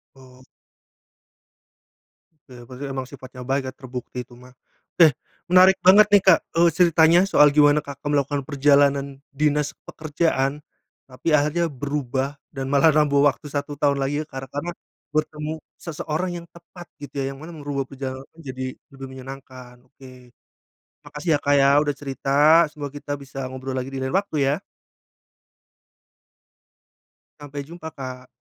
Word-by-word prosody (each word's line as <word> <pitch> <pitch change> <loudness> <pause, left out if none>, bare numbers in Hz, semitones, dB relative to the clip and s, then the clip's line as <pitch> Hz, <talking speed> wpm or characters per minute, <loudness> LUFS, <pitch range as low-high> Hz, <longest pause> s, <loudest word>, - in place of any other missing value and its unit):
Oh. 130 -1 -17 2.1
Ya 125 -1 -12
berarti 130 +4 -8
emang 135 -1 -4
sifatnya 130 -1 -11
baik 135 +1 -1
ya 130 - -6
terbukti 125 -1 -8
itu 125 - -29
mah. 125 0 -17 0.5
Eh 155 - +7 0.4
menarik 185 +1 +7
banget 200 +3 +8
nih, 205 -2 +7
Kak, 175 -4 +7 0.2
eee, 170 +1 +5
ceritanya 170 -1 +5
soal 150 -6 +6
gimana 145 0 +5
Kakak 140 0 -8
melakukan 145 -1 0
perjalanan 140 -1 +2 0.2
dinas 150 0 0
pekerjaan. 150 -2 -1 0.5
Tapi 130 - -9
akhirnya 150 +4 +1
berubah 140 -1 -3 0.2
dan 135 0 -4
malah 145 +3 +5
nambah 145 -2 +3
waktu 145 +1 -2
1 145 +1 -3
tahun 145 -2 +2
lagi 145 +3 -1
kar 135 -1 -6
karena 155 +5 -4 0.4
bertemu 155 0 -2 0.2
seseorang 165 +2 -3
yang 170 - -12
tepat 170 +1 -13 0.2
gitu 145 0 -6
ya. 135 - -3
Yang - - -13
mana 165 - -9
merubah 140 -1 -3
perjalanan 135 0 -7
menjadi 130 -5 -7 0.3
lebih 135 0 -8
menyenangkan, 130 -1 -11
oke. 135 0 -16 1.0
Makasih 150 +3 -6
ya, - - -1
Kak 145 - +2
ya 135 - +5 0.2
udah 145 -2 -2
cerita 135 -1 -6 0.4
semoga 145 -2 -7
kita 145 0 -7
bisa 135 -1 -7
ngobrol 130 0 -6
lagi 130 +1 -4
di 135 - -5
lain 130 - -2
waktu 195 -4 -1 0.2
ya. - - -8 2.8
Sampai 145 -1 -7
jumpa, 160 +2 -9
Kak. 130 -1 -8
145 Hz, 145 wpm, -23 LUFS, 135-155 Hz, 2.8 s, banget